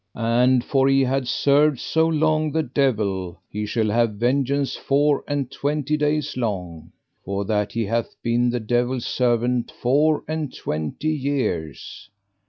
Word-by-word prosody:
And 120 Hz, +2 st, +2 dB
for 135 Hz, -1 st, +2 dB
he 135 Hz, 0 st, +4 dB
had 130 Hz, 0 st, 0 dB
served 140 Hz, +2 st, +3 dB
so 160 Hz, 0 st, +1 dB
long 155 Hz, -1 st, +1 dB
the 160 Hz, +1 st, 0 dB
devil, 105 Hz, -, -1 dB
he 105 Hz, 0 st, -4 dB
shall 110 Hz, -1 st, 0 dB
have 115 Hz, -1 st, +1 dB
vengeance 135 Hz, +4 st, 0 dB
four 145 Hz, +1 st, +1 dB
and 140 Hz, -3 st, -2 dB
twenty 150 Hz, +1 st, -1 dB
days 150 Hz, 0 st, -1 dB
long, 90 Hz, -9 st, -4 dB, 0.3 s
for 100 Hz, +1 st, -3 dB
that 105 Hz, -1 st, -1 dB
he 115 Hz, -1 st, -1 dB
hath 115 Hz, +3 st, -2 dB
been 120 Hz, +1 st, +2 dB
the 120 Hz, 0 st, -1 dB
devil's 120 Hz, +2 st, -1 dB
servant 120 Hz, -1 st, 0 dB
four 150 Hz, +5 st, +1 dB
and 155 Hz, -3 st, -3 dB
twenty 80 Hz, -, -3 dB
years. 130 Hz, -, -3 dB
125 Hz, 145 wpm, -22 LUFS, 115-145 Hz, 0.3 s, he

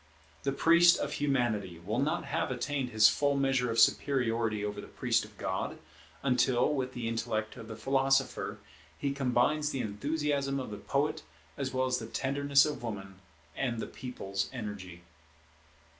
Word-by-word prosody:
The 140 Hz, -, 0 dB
priest 170 Hz, +4 st, +6 dB
of -, -, -3 dB
Humanity 120 Hz, -, 0 dB
will 105 Hz, +8 st, -3 dB
not 145 Hz, +2 st, 0 dB
have 140 Hz, -, -1 dB
attained 130 Hz, +1 st, -2 dB
his 110 Hz, -2 st, +6 dB
full 145 Hz, -1 st, +2 dB
measure 135 Hz, -3 st, +2 dB
of 115 Hz, -, -2 dB
superiority 115 Hz, -4 st, +2 dB
over 105 Hz, 0 st, -4 dB
the -, -, -11 dB
priest 120 Hz, -2 st, 0 dB
of 105 Hz, -1 st, -13 dB
God, 95 Hz, 0 st, -3 dB, 0.5 s
until, 125 Hz, +1 st, +3 dB
with 130 Hz, -2 st, -2 dB
the 120 Hz, -2 st, -4 dB
intellect 115 Hz, -1 st, -2 dB
of 110 Hz, -, -9 dB
the 110 Hz, -, -7 dB
Philosopher, 135 Hz, 0 st, +1 dB, 0.4 s
he 140 Hz, -, -1 dB
combines 140 Hz, +3 st, +1 dB
the 135 Hz, -3 st, -2 dB
enthusiasm 140 Hz, +5 st, -1 dB
of 125 Hz, -5 st, -5 dB
the 105 Hz, -, -5 dB
Poet, 140 Hz, +8 st, -1 dB, 0.3 s
as 135 Hz, -2 st, -3 dB
well 130 Hz, 0 st, +1 dB
as 125 Hz, -1 st, 0 dB
the 110 Hz, -, -6 dB
tenderness 140 Hz, +3 st, +3 dB
of 150 Hz, -1 st, -3 dB
Woman, 95 Hz, -5 st, -6 dB, 0.4 s
and 120 Hz, -4 st, -1 dB
the -, -, -2 dB
People's 100 Hz, -6 st, -4 dB
energy. 100 Hz, -8 st, -7 dB
125 Hz, 160 wpm, -31 LUFS, 110-140 Hz, 0.5 s, priest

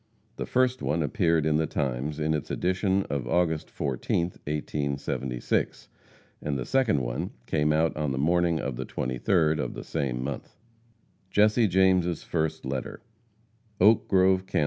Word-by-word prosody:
The -, -, -4 dB
first 130 Hz, 0 st, +1 dB
one 80 Hz, +2 st, 0 dB
appeared 85 Hz, -2 st, +1 dB
in 75 Hz, -1 st, +3 dB
the 80 Hz, 0 st, +1 dB
Times 70 Hz, +2 st, -2 dB
in 80 Hz, +1 st, +1 dB
its 75 Hz, -, -3 dB
edition 95 Hz, +2 st, +1 dB
of 70 Hz, -6 st, -3 dB
August 80 Hz, -3 st, +1 dB
14th, 75 Hz, +5 st, -2 dB
1876, 70 Hz, -4 st, -2 dB, 0.5 s
and 75 Hz, -2 st, -2 dB
the 65 Hz, -, -4 dB
second 125 Hz, -, +2 dB
one -, -, -3 dB, 0.2 s
came 75 Hz, -1 st, +1 dB
out 80 Hz, +1 st, +2 dB
on 75 Hz, -2 st, -1 dB
the 65 Hz, -, -2 dB
morning 85 Hz, +3 st, +2 dB
of 70 Hz, -4 st, -3 dB
the -, -, -4 dB
23d 75 Hz, +5 st, +1 dB
of -, -, -3 dB
the -, -, -6 dB
same 65 Hz, -2 st, -2 dB
month. 70 Hz, +4 st, -6 dB, 0.7 s
JESSE 105 Hz, +3 st, +4 dB
JAMES' 90 Hz, -2 st, +2 dB
FIRST 80 Hz, -3 st, -2 dB
LETTER. 65 Hz, -1 st, -4 dB, 0.8 s
OAK 105 Hz, +4 st, +5 dB
GROVE, 95 Hz, 0 st, +3 dB
Kan. -, -, 0 dB
80 Hz, 150 wpm, -27 LUFS, 70-90 Hz, 0.8 s, OAK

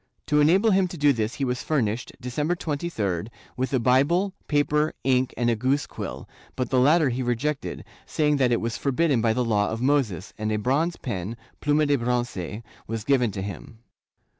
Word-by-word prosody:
To 150 Hz, -1 st, +2 dB
enable 190 Hz, +9 st, +4 dB
him 190 Hz, -1 st, +3 dB
to 175 Hz, -, -8 dB
do 145 Hz, -1 st, +4 dB
this 110 Hz, -1 st, -2 dB
he 140 Hz, -, -1 dB
was 125 Hz, 0 st, -2 dB
furnished, 125 Hz, -6 st, -1 dB
December 145 Hz, +7 st, -1 dB
23d, 140 Hz, -, -2 dB, 0.3 s
with 130 Hz, +1 st, -2 dB
a 130 Hz, -, +2 dB
Bible, 145 Hz, -, +2 dB
paper, 150 Hz, +1 st, +1 dB
ink 130 Hz, 0 st, +2 dB
and 120 Hz, -, +1 dB
a 120 Hz, -, +3 dB
goose 130 Hz, +6 st, 0 dB
quill, -, -, -7 dB, 0.3 s
but 125 Hz, -, -3 dB
the 130 Hz, -, +4 dB
latter 150 Hz, +3 st, +4 dB
he 125 Hz, +1 st, -2 dB
rejected, 130 Hz, +4 st, -2 dB, 0.2 s
saying 150 Hz, -1 st, +1 dB
that 130 Hz, -3 st, +2 dB
it 120 Hz, -, +2 dB
was 115 Hz, -1 st, -2 dB
forbidden 140 Hz, -2 st, +1 dB
by 110 Hz, 0 st, +2 dB
the 125 Hz, +1 st, 0 dB
Law 105 Hz, -3 st, +1 dB
of 110 Hz, -, -3 dB
Moses, 125 Hz, -, 0 dB
and 110 Hz, 0 st, -1 dB
a 105 Hz, -, +1 dB
bronze 145 Hz, +10 st, +1 dB
pen 105 Hz, -1 st, -5 dB, 0.2 s
(pluma 150 Hz, +1 st, +2 dB
de 145 Hz, -1 st, +2 dB
bronce) 120 Hz, -4 st, -2 dB, 0.2 s
was 115 Hz, -1 st, -4 dB
given 125 Hz, -2 st, +2 dB
to 95 Hz, -, -4 dB
him. 100 Hz, +3 st, -8 dB
130 Hz, 190 wpm, -25 LUFS, 115-150 Hz, 0.3 s, enable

